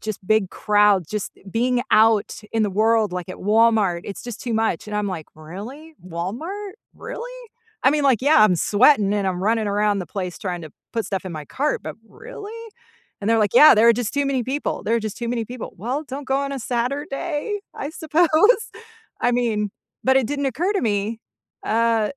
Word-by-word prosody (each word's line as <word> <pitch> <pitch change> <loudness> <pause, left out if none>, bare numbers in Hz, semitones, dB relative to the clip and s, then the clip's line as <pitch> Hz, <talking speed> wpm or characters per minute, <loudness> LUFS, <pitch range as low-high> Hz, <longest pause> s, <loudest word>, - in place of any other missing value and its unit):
"Just 215 -3 -6
big 215 -4 +2
crowds, 205 -5 +3
just 210 -2 -3 0.2
being 245 +3 +1
out 220 -1 +3
in 225 -1 +1
the 205 - 0
world, 215 0 +2
like, 180 0 -5
at 185 - -7
Walmart, 210 -4 +2
it's 200 - -7
just 240 -3 -7
too 235 -2 -3
much," 220 -5 0
and 210 0 -4
I'm, 210 -1 -1
like, 170 -5 -5
"Really? 215 - -10
Walmart? 245 - -5 0.2
Really?" - - -7 0.5
I 265 - +5
mean, 295 0 +1
like, 260 -5 +3
yeah, 295 -2 +5
I'm 185 -5 +4
sweating 210 - +4
and 200 -2 0
I'm 185 0 -2
running 220 +1 +1
around 205 0 +1
the 180 - -4
place 185 -3 -5
trying 175 -3 -4
to 155 - -9 0.2
put 225 -2 -1
stuff 195 -1 -3
in 180 - -5
my 155 -2 -6
cart, 290 - -2
but, - - -7
really? 425 - -10 0.7
And 200 - -2
they're, 225 - +4
like, 210 -3 +1
"Yeah, 305 - +9
there 225 +2 +5
are 235 - +8
just 240 0 -3
too 285 0 +1
many 265 -3 0
people, 275 +4 -3
there 225 - +1
are - - -1
just 215 -2 -5
too 235 - -3
many 235 -1 -1
people." 245 +1 -8
"Well, 250 - -3
don't 275 0 -7
go 265 - +1
on 280 0 -2
a 275 - -3
Saturday, 285 - -2 0.2
I 285 - -5
suppose. 320 +2 +1 0.9
I 245 - +2
mean, 220 -4 0 0.3
but, 265 +1 +4
it 265 -4 +3
didn't 285 0 -1
occur 330 - 0
to 395 - +1
me, 215 0 -1 0.5
uh, 225 -1 +2
225 Hz, 205 wpm, -22 LUFS, 205-270 Hz, 0.9 s, Yeah